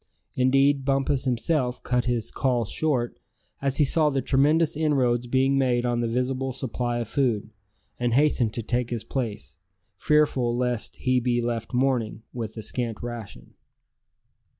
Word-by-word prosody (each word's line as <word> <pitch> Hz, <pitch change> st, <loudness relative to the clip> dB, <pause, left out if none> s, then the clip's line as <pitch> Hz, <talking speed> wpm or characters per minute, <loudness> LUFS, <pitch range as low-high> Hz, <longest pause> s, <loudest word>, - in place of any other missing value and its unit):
Indeed, 135 Hz, +2 st, +3 dB
Bumpus 135 Hz, 0 st, 0 dB
himself 125 Hz, 0 st, 0 dB
cut 125 Hz, -1 st, 0 dB
his 120 Hz, -3 st, -1 dB
"call" 125 Hz, -4 st, 0 dB
short, 125 Hz, 0 st, -1 dB, 0.4 s
as 135 Hz, -1 st, 0 dB
he 150 Hz, -, +4 dB
saw 155 Hz, +2 st, +4 dB
the 135 Hz, -2 st, 0 dB
tremendous 150 Hz, +5 st, +3 dB
inroads 130 Hz, -6 st, +1 dB
being 135 Hz, +2 st, +2 dB
made 125 Hz, -2 st, +1 dB
on 120 Hz, -1 st, 0 dB
the 120 Hz, -, 0 dB
visible 130 Hz, +2 st, -1 dB
supply 120 Hz, -1 st, -2 dB
of 120 Hz, -2 st, -3 dB
food; 115 Hz, -5 st, 0 dB, 0.5 s
and 120 Hz, -1 st, +1 dB
hastened 130 Hz, -6 st, +2 dB
to 115 Hz, -, -3 dB
take 120 Hz, +1 st, -1 dB
his 120 Hz, -3 st, -3 dB
place, 110 Hz, -, -5 dB, 0.4 s
fearful 135 Hz, -6 st, +2 dB
lest 125 Hz, -2 st, -2 dB
he 130 Hz, 0 st, +1 dB
be 120 Hz, 0 st, 0 dB
left 115 Hz, -1 st, -3 dB
mourning, 125 Hz, -4 st, 0 dB
with 115 Hz, -2 st, -5 dB
a 110 Hz, -, -5 dB
scant 120 Hz, -2 st, -2 dB
ration. 115 Hz, -, -8 dB
125 Hz, 150 wpm, -25 LUFS, 120-135 Hz, 0.5 s, he